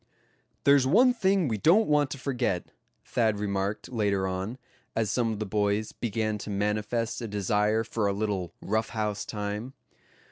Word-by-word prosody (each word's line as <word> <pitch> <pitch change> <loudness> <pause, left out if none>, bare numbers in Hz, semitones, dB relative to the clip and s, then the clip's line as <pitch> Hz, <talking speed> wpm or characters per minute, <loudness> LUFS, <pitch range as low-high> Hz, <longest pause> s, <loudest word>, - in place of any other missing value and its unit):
"There's 140 -2 +5
one 245 - +5
thing 195 - +2
we 110 -4 -1
don't 190 - +5
want 150 -2 +3
to 140 - -5
forget," 125 -9 -2 0.3
Thad 110 -3 +1
remarked 100 0 -2
later 100 -5 +1
on, 95 +6 -3 0.4
as 110 -2 +1
some 120 -2 +1
of 110 - -3
the 110 - -3
boys 105 +1 0
began 110 -2 -2
to 105 - -7
manifest 105 +4 -1
a 115 - -3
desire 105 +2 +1
for 110 -2 -1
a - - +2
little 100 -4 -2
"rough 110 +2 0
house" 105 -2 -2
time. 105 +4 -4
110 Hz, 165 wpm, -28 LUFS, 105-120 Hz, 0.4 s, There's